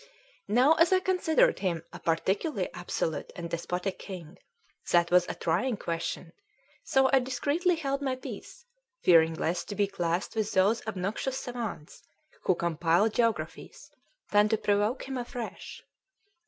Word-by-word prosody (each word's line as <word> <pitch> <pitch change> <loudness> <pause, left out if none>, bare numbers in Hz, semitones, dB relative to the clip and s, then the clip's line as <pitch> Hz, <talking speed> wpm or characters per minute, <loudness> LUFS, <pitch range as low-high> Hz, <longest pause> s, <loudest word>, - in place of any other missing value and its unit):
Now, 250 +9 +5
as 330 +2 +4
I 375 - +5
considered 370 +5 +2
him 170 -4 -1
a - - -8
particularly 190 - -1
absolute 165 -4 -3
and 170 -1 -5
despotic 180 +3 -3
king, 180 -3 -9 0.5
that 170 0 +3
was 180 0 +5
a - - -3
trying 250 -3 0
Question; 165 0 -4 0.5
so 265 0 +3
I 270 - +7
discreetly 295 +8 0
held 275 -3 -2
my 265 -2 -1
peace, 485 - -9 0.4
fearing 165 -2 +5
less 170 +2 -1
to 205 - -6
be 205 - +2
classed 180 -1 -2
with 215 -1 -1
those 200 +5 +3
obnoxious 215 +6 -2
savans 235 - -6 0.4
who 185 - +3
compile 170 +4 +2
geographies 230 0 -2 0.4
than 210 0 +5
to 220 - +2
provoke 205 +6 0
him 265 -1 -3
afresh. 245 -1 -7
205 Hz, 140 wpm, -29 LUFS, 175-265 Hz, 0.5 s, I